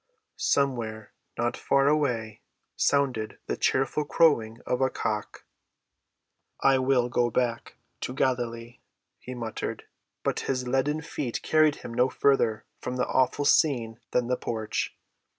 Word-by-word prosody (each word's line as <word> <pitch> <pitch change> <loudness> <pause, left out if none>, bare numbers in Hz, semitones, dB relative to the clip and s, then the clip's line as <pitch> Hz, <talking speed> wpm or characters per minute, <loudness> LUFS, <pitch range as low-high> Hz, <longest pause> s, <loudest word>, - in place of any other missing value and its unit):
Somewhere, 115 -6 0 0.2
not 120 +1 0
far 140 0 +2
away, 125 -8 0 0.3
sounded 125 -7 +1
the - - -2
cheerful 135 +3 +1
crowing 120 -8 +3
of 125 - -1
a 130 - +3
cock. 105 -4 -4 1.1
"I 135 -1 +4
will 130 -2 +2
go 120 0 +1
back 120 0 -1 0.2
to 125 - -4
Galilee," 120 -3 -1 0.4
he 125 - -8
muttered. 115 -2 -4 0.4
But - - 0
his 130 -2 -1
leaden 135 +5 +1
feet 140 -6 -4
carried 155 -1 +4
him 115 - -6
no 125 +2 +3
farther 125 -6 +2
from 125 - -4
the 125 - +1
awful 130 +2 +1
scene 120 -7 +3
than 125 - +1
the 125 +1 0
porch. 110 -1 -3
125 Hz, 135 wpm, -27 LUFS, 115-135 Hz, 1.1 s, I